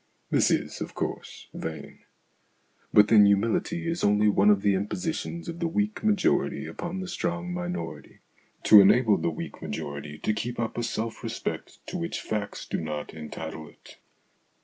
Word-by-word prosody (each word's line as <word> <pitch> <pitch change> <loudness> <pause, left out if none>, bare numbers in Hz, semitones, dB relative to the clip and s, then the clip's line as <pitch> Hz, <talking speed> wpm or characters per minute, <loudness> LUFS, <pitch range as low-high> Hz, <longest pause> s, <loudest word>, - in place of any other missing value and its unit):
This - - +4
is, - - -1
of - - -5
course, - - -5
vain. 80 -3 -7 0.9
But 105 0 +6
then 105 -2 +7
humility 115 +12 +1
is 165 +1 -2
only 105 +1 +4
one 100 0 +4
of 100 -1 +4
the 100 - +4
impositions 165 - -3
of 170 0 -6
the 170 - 0
weak 205 +6 -1
majority 210 -3 +1
upon 175 +2 -5
the 185 - -5
strong 175 0 -3
minority, 180 0 -5 0.4
to 105 -2 +9
enable 110 +1 +5
the - - 0
weak 80 - -7
majority 70 +1 -5
to 110 - 0
keep 120 +3 -4
up 115 -1 -2
a 120 - -1
self 115 -1 -3
respect - - -5
to 180 - -5
which 170 0 -3
facts 105 -2 -4
do - - -3
not 75 -2 -5
entitle 80 0 -7
it. - - -17
110 Hz, 165 wpm, -27 LUFS, -, 0.9 s, to